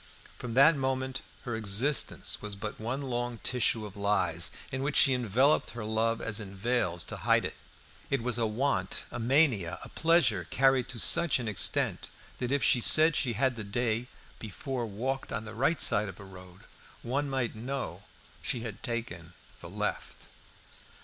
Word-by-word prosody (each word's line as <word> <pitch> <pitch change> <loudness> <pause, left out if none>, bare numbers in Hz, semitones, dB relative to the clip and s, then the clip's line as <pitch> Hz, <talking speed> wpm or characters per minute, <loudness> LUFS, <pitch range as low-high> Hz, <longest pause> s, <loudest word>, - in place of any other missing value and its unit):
From 120 -2 -5
that 140 +5 +6
moment 130 -1 -2 0.2
her 120 -2 -4
existence 110 +7 +1
was 105 -1 -5
but 105 +2 -6
one 125 +6 -3
long 120 -2 -3
tissue 120 -3 +1
of 100 - -10
lies, 100 -4 +1 0.2
in 130 0 -3
which 140 +2 -1
she 135 - +6
enveloped 125 +4 +2
her 115 -2 -7
love 115 +1 0
as 110 0 -2
in 100 -2 -8
veils 95 -5 0
to - - -7
hide - - +2
it. - - -5 0.5
It 135 -4 0
was 120 -1 0
a 115 - +1
want, 105 -4 -1
a - - -5
mania, 120 - +2
a - - -9
pleasure 160 - +2
carried 135 -2 +3
to 125 - -2
such 170 +9 +5
an 120 -3 -5
extent 105 - +1 0.3
that 125 0 -2
if 140 0 +1
she 120 - +4
said 155 +5 +4
she 125 -4 +1
had 130 +3 +1
the 110 - -6
day 115 +3 -1 0.3
before 120 +3 -5
walked 130 +6 -4
on 110 - -4
the 110 - -8
right 135 +8 +1
side 105 0 +3
of 95 - -11
a - - -10
road, 90 -1 -13 0.4
one 140 +4 -1
might 130 -4 -2
know 130 +5 -5 0.4
she 120 - -2
had 110 -4 -7
taken 115 -9 -5 0.3
the - - -10
left. - - -4
120 Hz, 175 wpm, -29 LUFS, 105-135 Hz, 0.5 s, that